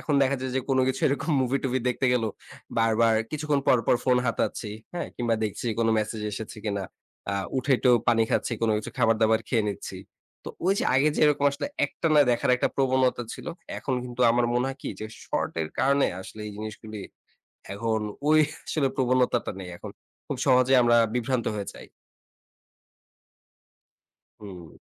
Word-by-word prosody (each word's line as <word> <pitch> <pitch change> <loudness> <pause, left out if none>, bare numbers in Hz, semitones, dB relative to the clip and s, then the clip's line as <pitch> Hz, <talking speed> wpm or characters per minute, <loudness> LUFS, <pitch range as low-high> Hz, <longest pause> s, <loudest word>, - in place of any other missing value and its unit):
এখন 150 - -1
দেখা 135 +1 +2
যায় 130 -1 -3
যে 130 - +2
কোন 135 -1 +2
কিছু 130 - -2
এরকম 140 +3 -1
মুভি-টুভি 130 0 0
দেখতে 125 +1 0
গেলেও 115 -3 +1 0.5
বারবার 115 0 +3 0.2
কিছুক্ষণ 150 -2 0
পর, 125 - +5
পর, - - +4
ফোন 125 -1 +4
হাতাচ্ছি 115 -1 -1 0.2
হ্যাঁ 175 - -4
কিংবা 120 -1 0
দেখছি 105 +3 -4
কোন 115 - +2
মেসেজ 110 0 -3
এসেছে 110 +1 -6
কিনা? 100 -2 -2 0.5
আ - - -1 0.2
উঠে 130 +2 -2
একটু 125 - +3 0.2
পানি 115 -1 +4
খাচ্ছি - - 0
কোন 115 - +3
কিছু 105 - -6
খাবার-দাবার 110 -1 +3
খেয়ে 115 -4 +1
নিচ্ছি। 100 - -6 0.5
তো - - -5 0.2
ঐ - - +1
যে - - 0
আগে 135 +3 +4
যে - - 0
এরকম 145 -1 +2
আসলে 140 - -3 0.2
একটানা 155 -2 +2
দেখার 120 +1 +1
একটা - - +1
প্রবণতা 130 -2 +2
ছিল। - - -11 0.3
এখন 130 - -2
কিন্তু 125 0 -7
আমার 120 +1 +2
মনে 125 +2 +1
হয় 135 0 -6
কি - - -4
যে 110 - -4 0.2
শর্ট - - -2
এর 80 - -4
কারণে 140 +1 +3
আসলে 100 +3 -10
এই 105 - -6
জিনিসগুলি 110 0 -7 0.7
এখন 110 +2 -1 0.3
ঐ - - +3 0.4
আসলে 140 -4 +1
প্রবণতাটা 125 -2 +1
নেই 90 - -7
এখন। - - -8 0.4
খুব - - -3
সহজেই 130 +1 +5
আমরা 120 0 +4 0.2
বিভ্রান্ত 125 0 0
হয়ে 100 -1 -4
যাই। - - -12 2.5
হুম। 90 -6 -10
120 Hz, 170 wpm, -26 LUFS, 110-130 Hz, 2.5 s, পর